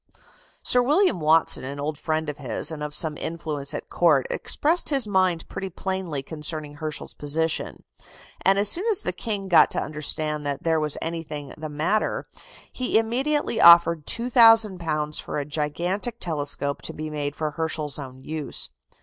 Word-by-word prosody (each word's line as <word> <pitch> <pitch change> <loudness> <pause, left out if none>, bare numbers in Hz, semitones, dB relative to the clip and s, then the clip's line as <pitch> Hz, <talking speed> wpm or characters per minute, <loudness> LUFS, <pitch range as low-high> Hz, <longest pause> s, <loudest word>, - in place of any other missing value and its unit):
Sir 250 - +4
William 300 - +2
Watson, 160 -1 +3
an 140 +2 -6
old 150 +2 -3
friend 155 +1 -2
of 150 0 -5
his, 135 +3 -1
and 155 -2 -6
of 150 0 -3
some 155 0 +1
influence 155 -4 -3
at - - -6
Court, 155 -7 +3
expressed 330 +4 +1
his 275 -5 +2
mind 185 -4 +1
pretty 195 - -5
plainly 185 -6 -4
concerning 150 0 -6
Herschel's 155 0 -6
position; 155 +2 -2 0.6
and 195 +1 +4
as 200 +1 +3
soon 355 - +1
as 420 - 0
the 180 - 0
King 200 +1 -4
got 175 - +6
to - - -2
understand 150 0 -3
that 140 -1 -3
there 160 -1 +2
was 150 -1 -2
anything 155 -4 -5
the 155 0 -7
matter, 160 +9 -1 0.5
he 255 -3 0
immediately 245 +2 0
offered 170 -2 +7
£2,000 210 - +4
for - - -5
a 145 - -2
gigantic 175 - -2
telescope 145 -3 -3
to - - -5
be 155 0 -6
made 145 -1 -3
for 155 -1 -2
Herschel's 155 -2 -3
own 130 -1 -9
use. 155 -1 -1
160 Hz, 165 wpm, -24 LUFS, 150-195 Hz, 0.6 s, offered